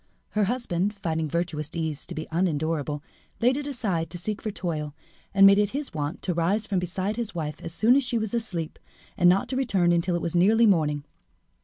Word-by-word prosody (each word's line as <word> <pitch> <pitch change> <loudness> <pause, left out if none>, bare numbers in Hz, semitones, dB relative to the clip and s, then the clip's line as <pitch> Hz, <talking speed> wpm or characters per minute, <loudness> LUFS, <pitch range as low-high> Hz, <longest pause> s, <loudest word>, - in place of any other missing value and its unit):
Her 210 -1 +1
husband, 205 -4 -1
finding 160 -5 -2
virtuous 160 -2 -2
ease 160 -3 -3
to 175 - -6
be 155 - -4
unendurable, 155 -3 -1 0.4
laid 245 +3 +3
it 290 0 -4
aside 200 - -2
to 175 - -5
seek 210 +4 -4
for 215 - -3
toil, 155 -7 -4 0.4
and 195 0 +6
made 200 +1 +7
it 205 -1 +2
his 290 -1 -5
wont 150 0 -4
to 180 - 0
rise 185 +6 +1
from 195 -3 0
beside 185 +4 -2
his 230 -5 -3
wife 150 -3 -4
as 165 - -6
soon 225 +8 +4
as 280 - +3
she 245 -1 0
was 220 -1 -2
asleep, 180 -9 -3 0.4
and 175 - +5
not 190 +2 +3
to 260 - -2
return 195 -10 +2
until 175 +1 +1
it 175 - -1
was 170 - -2
nearly 215 +6 +5
morning. 150 -8 +2
180 Hz, 210 wpm, -26 LUFS, 165-215 Hz, 0.4 s, made